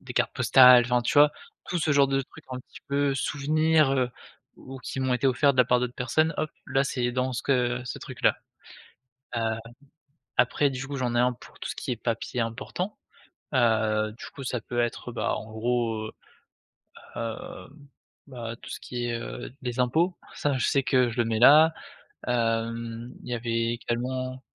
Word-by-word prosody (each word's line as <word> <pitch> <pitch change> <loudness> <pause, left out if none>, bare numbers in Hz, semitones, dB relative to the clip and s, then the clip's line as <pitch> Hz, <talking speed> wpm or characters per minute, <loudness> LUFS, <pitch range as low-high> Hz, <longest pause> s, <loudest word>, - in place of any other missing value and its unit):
des - - -9
cartes - - +1
postales, 125 -2 +7
enfin, 125 0 +2
tu - - -1
vois, 150 0 +7 0.4
tout 175 0 -1
ce 155 -1 +2
genre 140 -1 +4
de 135 0 +1
trucs - - -16
un 130 0 -4
petit - - -15
peu 140 0 +1
souvenirs, 155 +2 +2
heu, 130 -2 +1 0.5
ou 135 0 -10
qui 130 - -5
m'ont 130 -1 +1
été 135 - +1
offerts 135 +2 +4
de - - -8
la 125 - +7
part 125 0 +2
d'autres 125 0 -2
personnes. 155 +5 +1
Hop 155 - -2 0.2
là, 135 0 +1
c'est 125 -2 -1
dans 130 +1 -1
ce 125 - -3
que 125 -2 +1
ce 125 - -5
truc - - -10
là. - - +4 1.0
Heu, 110 -1 0 0.8
après 145 - +3
du 135 0 -5
coup, 140 - -5
j'en 125 -2 -1
ai - - +3
1 125 +1 +3
pour - - -16
tout - - -5
ce - - -4
qui - - -4
est - - 0
papiers 115 +1 -2
importants, 125 - -4 0.6
heu, 110 -3 +2
du - - -8
coup 140 - -8
ça 125 -1 -2
peut 120 +1 -3
être 120 +1 -2
bah, 115 - -1
en 110 - -7
gros, 115 -1 -1
heu - - -10 1.1
heu, 115 -1 -6 0.6
bah, 120 -4 -6
tout - - -10
ce - - -6
qui 120 -1 -5
est, 120 - -2
heu, 115 - -7
les 125 -1 -4
impôts, 160 +9 +2 0.2
ça 145 - 0
je - - +1
sais 140 - +2
que 130 -2 +3
je 115 - -9
le 120 - +2
mets 110 -1 -1
là. 155 +6 +8 0.6
Hem, 115 0 -1
il - - -11
y 120 - 0
avait 115 0 -1
également 130 +2 -3
125 Hz, 200 wpm, -27 LUFS, 120-135 Hz, 1.1 s, là